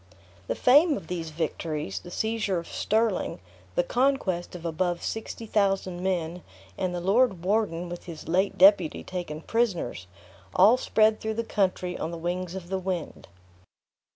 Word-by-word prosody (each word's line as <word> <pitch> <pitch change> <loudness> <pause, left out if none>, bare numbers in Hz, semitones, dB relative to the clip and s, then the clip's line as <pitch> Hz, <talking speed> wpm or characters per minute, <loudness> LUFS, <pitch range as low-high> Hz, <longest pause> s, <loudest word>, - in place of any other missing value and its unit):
The - - -1
fame 290 +4 +5
of - - -8
these 170 -3 -3
victories, 155 - -3
the - - -11
seizure 220 0 -1
of 170 - -5
Stirling, 220 -2 0 0.4
the 175 - +3
conquest 225 -7 0
of 175 -1 -8
above 175 +1 -1
sixty 225 +1 -4
thousand 195 -4 0
men, 180 -2 -1 0.3
and 180 - -2
the - - -2
lord 195 0 +2
warden 185 -4 0
with 175 0 -7
his 165 -3 -9
late 190 +4 +1
deputy 190 -4 +5
taken 175 -4 -5
prisoners, 175 - -1 0.5
all 205 +6 +7
spread 220 -3 +3
through 220 0 -2
the 230 - -1
country 185 -4 -1
on 160 - -2
the 170 - -6
wings 175 +2 -3
of 180 -2 -7
the 190 0 -1
wind. 185 -3 -4
185 Hz, 155 wpm, -27 LUFS, 170-215 Hz, 0.5 s, all